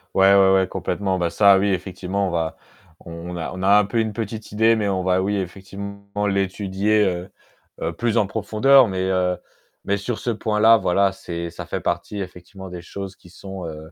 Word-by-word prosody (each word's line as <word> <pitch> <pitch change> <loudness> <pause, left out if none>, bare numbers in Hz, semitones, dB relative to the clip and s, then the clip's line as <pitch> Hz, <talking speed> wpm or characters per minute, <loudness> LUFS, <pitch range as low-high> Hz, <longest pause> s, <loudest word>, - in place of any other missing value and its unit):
Ouais, 95 +1 +6
ouais, 95 -1 +6
ouais, 95 -1 +3
complètement. 95 0 -2
Bah, 85 -1 0
ça, 100 +1 +5
oui 100 - +1
effectivement 95 +1 -2
on - - -3
va 80 -1 -2 0.4
on 85 +1 -8
a 80 - -4
on 95 - -6
a 100 +2 +5
un 105 - +4
peu 115 +3 -1
une 110 -1 0
petite 110 0 -6
idée, 110 +2 +4
mais 105 -2 0
on 95 -1 -1
va, 95 0 +2
oui, 100 +2 0
effectivement 100 +2 -6
l'étudier, 100 +2 +1
heu, 90 0 -2 0.5
heu, 85 +1 -2
plus 120 +5 -1
en 105 - +4
profondeur, 110 +5 +4
mais, 95 -1 -2
heu, 90 -1 +1 0.5
mais 100 - +1
sur 110 +3 -3
ce 120 - -1
point-là, 110 +1 +4
voilà, 95 0 +2
c'est 85 -3 -6
ça - - -8
fait - - -3
partie 85 +4 -3
effectivement 95 +1 -9
des 90 -1 -7
choses 95 +2 -7
qui 90 - -18
sont, 95 0 -8
heu, 80 +1 -9
95 Hz, 205 wpm, -22 LUFS, 90-105 Hz, 0.5 s, Ouais